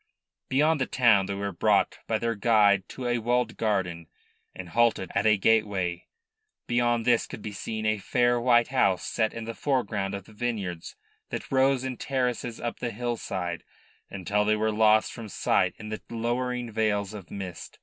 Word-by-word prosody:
Beyond 150 +2 +2
the - - +1
town 115 -7 +4
they 100 - -3
were 100 0 -3
brought 85 - +2
by 110 - +1
their 115 +1 -1
guide 105 -3 +3
to 130 - -7
a 120 0 +1
walled 120 +1 0
garden, 90 -6 -1 0.5
and 90 -2 -8
halted 115 -4 +2
at 105 +2 +2
a 105 -1 +5
gateway. 100 -5 +1 0.6
Beyond 120 -1 +1
this 120 -2 +3
could 110 - -9
be 105 - -5
seen 110 +2 -5
a 110 -1 +1
fair 120 +4 +1
white 120 -1 +4
house 100 -9 +2
set 110 -1 0
in 115 - -6
the 115 +1 -5
foreground 105 -8 -1
of 100 -2 -7
the 110 - -16
vineyards 105 -7 -4 0.3
that - - -6
rose 135 -1 +3
in 130 -2 -4
terraces 125 -3 -2
up 120 0 -4
the 120 - -2
hillside 105 -7 -3 0.5
until 100 +2 -1
they 105 +1 +2
were 110 +1 0
lost 110 0 +3
from 115 -2 -8
sight - - +1
in 105 -1 -8
the 110 - -5
lowering 120 +1 -2
veils 105 -2 0
of 100 -4 -9
mist. 95 -3 -7
110 Hz, 180 wpm, -27 LUFS, 100-120 Hz, 0.6 s, a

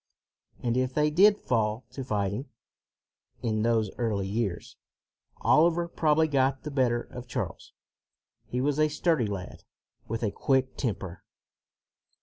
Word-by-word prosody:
And 120 0 +1
if 130 0 0
they 150 0 +3
did 200 +6 +6
fall 110 - -1
to 135 +1 -5
fighting, 105 +2 -2 0.9
in 110 -2 0
those 110 -2 +1
early 105 -5 0
years, 100 -3 -3 0.7
Oliver 170 +2 +4
probably 160 -1 +2
got 135 -2 +1
the 150 - -5
better 125 -4 +2
of 125 0 -10
Charles. - - -5 0.8
He 125 - -2
was 145 +2 0
a 155 0 +4
sturdy 150 -6 +1
lad, 95 -3 -6 0.4
with 115 +1 -3
a 105 - +1
quick 130 +1 +1
temper. 95 -7 -4
125 Hz, 135 wpm, -28 LUFS, 110-150 Hz, 0.9 s, did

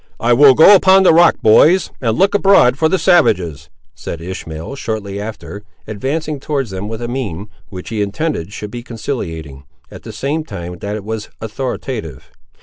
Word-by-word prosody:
"I 120 +1 +2
will 135 +1 +6
go 165 +8 +8
upon 190 0 +5
the 185 - +5
rock, 170 +1 +5
boys, 155 +11 +4
and 115 -3 -1
look 195 +1 +2
abroad 195 -11 +4
for 160 +2 +1
the 190 - +1
savages," 85 - +1 0.2
said 85 - -7
Ishmael 85 +3 -7
shortly 105 -6 -5
after, 105 -1 -8 0.2
advancing 145 +8 -4
towards 135 -5 -3
them 95 +2 -5
with 115 +2 -6
a - - -3
mien 110 -6 -5 0.2
which 90 -1 -9
he 110 -2 -3
intended 105 - -3
should 105 0 -7
be 120 - -6
conciliating, 85 - -6 0.3
at - - -11
the - - -9
same 150 +4 -3
time 90 - -8
that 100 +1 -4
it 105 - -6
was 110 0 -6
authoritative. 110 - -6
110 Hz, 175 wpm, -16 LUFS, 100-145 Hz, 0.3 s, go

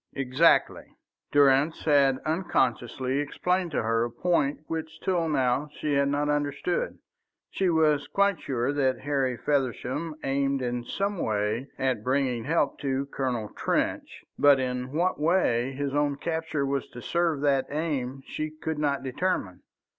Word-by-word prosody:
"Exactly." 135 +5 +2 0.4
Durrance 145 +2 +4
had 140 -3 +4
unconsciously 130 - 0
explained 180 +5 -1
to 145 - -1
her 115 +1 +1
a 120 - -2
point 145 +2 0
which 160 0 -5
till 175 -4 0
now 135 0 +1
she 150 - -1
had 140 0 +3
not 145 +1 0
understood. 145 +4 -1 0.5
She 190 -2 +1
was 155 -3 +2
quite 200 -3 +1
sure 130 +1 -1
that 135 -3 +1
Harry 135 -3 0
Feversham 145 +3 -1
aimed 135 0 0
in 120 0 -2
some 200 +4 -2
way 110 +3 -1
at 130 -5 -1
bringing 130 -2 0
help 150 -2 +1
to 135 -1 -1
Colonel 125 -6 -2
Trench, - - -2 0.2
but 145 -1 +6
in 125 0 -3
what 175 +4 0
way 150 -7 +2
his 140 0 -3
own 145 -1 +1
capture 160 -1 -2
was 140 -1 -2
to 120 - -10
serve 170 -4 0
that 140 -2 +2
aim 140 -4 -3
she 155 0 -4
could 155 0 -5
not 140 -2 0
determine. 130 - -2
140 Hz, 145 wpm, -27 LUFS, 130-155 Hz, 0.5 s, but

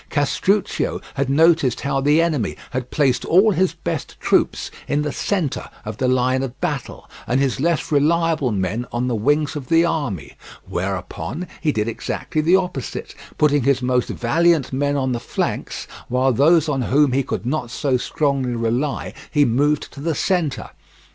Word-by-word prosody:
Castruccio 185 +7 0
had 140 -1 -1
noticed 160 -3 +3
how 135 -1 0
the 150 +4 +4
enemy 150 - -1 0.2
had 125 -1 -3
placed 135 -4 +1
all 195 +6 +5
his 185 0 +1
best - - -5
troops - - +1 0.2
in 145 +1 0
the 150 - -2
centre 175 -6 -2 0.2
of 110 0 -5
the 130 - 0
line 130 +1 +2
of 130 -2 -5
battle, - - -4 0.2
and 125 +2 +2
his 135 -2 0
less 165 +2 0
reliable 155 -2 +2
men 105 +5 -2
on 120 +1 -1
the 125 - 0
wings 145 +7 +1
of 140 -4 -6
the 165 +3 +4
army; 120 - -2 0.3
whereupon 95 - -4
he 155 - +2
did 110 -4 -1
exactly 135 +6 -2
the 170 +4 +4
opposite, 180 -9 -3 0.2
putting 145 -1 +3
his 135 0 +1
most 125 -1 +1
valiant 160 +2 +1
men 145 +1 0
on 130 -1 0
the 120 - -1
flanks, - - -3 0.2
while 130 +1 +2
those 160 +5 +4
on 140 -3 0
whom 140 +3 +3
he 135 +2 +2
could 125 - -4
not 130 -2 -2
so 135 +1 0
strongly 135 -1 0
rely 120 +5 -1 0.2
he 145 -2 +3
moved 145 +5 +1
to - - -10
the 160 +2 -1
centre. 170 -7 -1
140 Hz, 170 wpm, -21 LUFS, 125-155 Hz, 0.3 s, all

